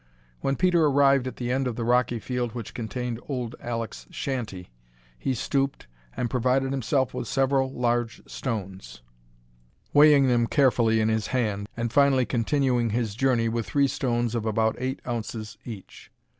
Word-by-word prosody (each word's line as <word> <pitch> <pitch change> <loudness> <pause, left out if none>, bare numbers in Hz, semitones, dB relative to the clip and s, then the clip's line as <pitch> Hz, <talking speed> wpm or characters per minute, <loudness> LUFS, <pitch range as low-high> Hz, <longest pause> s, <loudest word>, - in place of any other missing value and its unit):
When 135 - 0
Peter 175 0 +3
arrived 140 -2 +4
at 130 - -5
the 120 0 -3
end 130 0 0
of 120 - -3
the 115 - -3
rocky 120 0 +2
field 120 0 -3
which 115 -4 -6
contained 120 +1 -4
old 125 -4 -3
Alek's 115 - -4
shanty 110 - -4 0.4
he 130 - -2
stooped 135 +3 -1 0.3
and 120 - 0
provided 130 +2 +1
himself 130 0 0
with - - -4
several 135 0 +1
large 120 -2 -1
stones, 95 - -5 0.9
weighing 145 -2 +7
them 120 -2 +2
carefully 115 -5 +3
in 110 - +2
his 110 -1 0
hand, 105 -5 -1
and 115 0 -2
finally 140 -3 +4
continuing 125 -1 +1
his 110 -1 -1
journey 120 -1 +2
with 115 -2 -2
three 140 +8 +2
stones 120 -3 -1
of 115 -2 -1
about 110 0 +1
eight 130 +1 -2
ounces 115 -2 -5
each. 110 -6 -10
120 Hz, 155 wpm, -26 LUFS, 115-135 Hz, 0.9 s, weighing